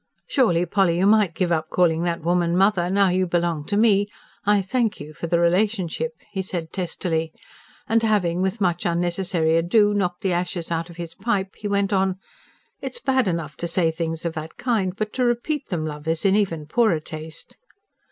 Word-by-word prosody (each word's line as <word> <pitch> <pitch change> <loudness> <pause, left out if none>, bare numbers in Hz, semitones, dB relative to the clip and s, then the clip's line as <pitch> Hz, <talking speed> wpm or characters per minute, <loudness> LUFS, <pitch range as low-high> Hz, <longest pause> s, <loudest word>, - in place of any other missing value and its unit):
"Surely, 180 -10 +2
Polly, 180 -3 +2
you 185 - +2
might 205 -5 +4
give 180 -2 0
up 155 -1 0
calling 165 -2 +2
that 170 -2 -2
woman 175 0 +1
'mother,' 190 -2 +3
now 195 0 +3
you 185 +1 +1
belong 170 -3 0
to 205 - -1
me 205 -2 +4 0.4
I 205 -1 +4
thank 225 +2 0
you 150 +1 -9
for 170 - -5
the 170 0 +2
relationship!" 170 -3 +1 0.2
he 195 - -2
said 175 -4 -5
testily. 165 -3 -2 0.6
And 225 +1 +3
having 190 -6 +1
with 190 +4 -1
much 175 -3 0
unnecessary 170 -1 +1
ado 205 +5 +3
knocked 180 -2 -1
the 190 -4 0
ashes 175 -1 -3
out 165 +1 -2
of 170 - -12
his 170 -1 -6
pipe, 195 -2 -2
he 205 - -5
went 200 0 +1
on: 190 -1 +2 0.7
"It's 480 - -5
bad 265 - +1
enough 165 -4 -2
to 170 - -3
say 165 -1 +1
things 165 0 -4
of 170 - -1
that 160 0 -7
kind; 210 -7 0
but 215 0 -3
to 255 - 0
repeat 245 +5 0
them, 165 -4 -2
love, 150 0 -6
is 165 +3 -1
in 195 0 +4
even 170 -7 0
poorer 200 0 +2
taste." 155 +1 -9
180 Hz, 195 wpm, -23 LUFS, 165-205 Hz, 0.7 s, might